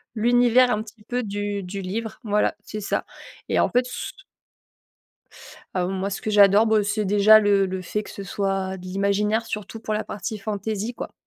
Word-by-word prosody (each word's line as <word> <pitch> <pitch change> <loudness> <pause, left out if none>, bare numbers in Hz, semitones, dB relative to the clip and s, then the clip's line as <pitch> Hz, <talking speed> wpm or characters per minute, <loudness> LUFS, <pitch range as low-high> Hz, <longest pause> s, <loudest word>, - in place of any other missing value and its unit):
l'univers 245 +2 +4
un 210 - 0
petit 215 0 -13
peu 245 +2 -2
du 205 0 -3
du 195 +2 -5
livre. 215 +4 -5
Voilà, 210 -1 +1
c'est 215 - -6
ça, 205 - -1 0.5
et - - +2
en - - +3
fait 250 +1 +2
s 250 - -6 1.6
Ah 180 -1 +1
bon, 185 - -3
moi, 195 +1 -2
ce 195 - -5
que - - -3
j'adore, 205 +1 +6
bah, 220 -2 +3
c'est 210 0 -1
déjà 210 +2 +7
le 200 -2 +3
le 190 0 -4
fait 210 +4 -3
que - - -12
ce 200 - -7
soit 195 -1 -2
de 185 - -11
l'imaginaire, 200 +4 0
surtout 220 0 -6
pour 220 -1 -3
la 215 +1 -1
partie 210 +2 -5
fantaisie, 215 +2 -3
quoi. - - -7
210 Hz, 195 wpm, -24 LUFS, 195-220 Hz, 1.6 s, déjà